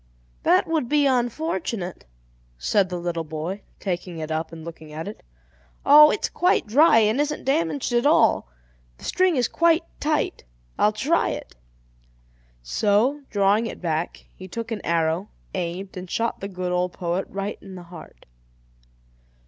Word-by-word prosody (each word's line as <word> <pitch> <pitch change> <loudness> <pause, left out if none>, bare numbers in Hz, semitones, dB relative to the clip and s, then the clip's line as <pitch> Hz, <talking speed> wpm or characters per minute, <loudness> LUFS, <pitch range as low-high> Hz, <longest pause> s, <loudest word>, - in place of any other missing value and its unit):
"That - - +4
would 315 -7 -1
be 295 -1 +3
unfortunate," 240 - -1 0.5
said 185 - +1
the 180 - -3
little 170 -1 -2
boy, 160 +6 -5 0.2
taking 180 -2 -4
it 160 0 -5
up 160 +1 -2
and 165 -1 -9
looking 160 -2 -10
at 160 +4 -6
it. 205 - -8 0.6
"Oh, 300 +1 +9
it's 410 - 0
quite 360 +1 +2
dry 265 +5 +5
and 220 +4 +3
isn't 300 0 -2
damaged 285 -2 0
at 240 +3 +3
all. 295 - +3 0.5
The - - -17
string 370 -2 +2
is 245 -4 +2
quite 335 0 +3 0.2
tight; 305 0 -1 0.4
I'll 210 - +4
try 270 +11 +1
it." - - -6 1.1
So, 210 - +2
drawing 205 +2 +2
it - - -7
back, 165 -1 -3
he 185 - -10
took 230 +4 -6
an 215 -3 -3
arrow, 165 +3 0 0.2
aimed, 185 +2 -4
and 180 -1 -7
shot 230 +4 -1
the 195 - -4
good 180 -2 -4
old 180 0 0
poet 175 +2 -2
right 195 +2 -4
in 190 - -10
the 180 - -9
heart. 170 -2 -13
200 Hz, 155 wpm, -24 LUFS, 175-265 Hz, 1.1 s, Oh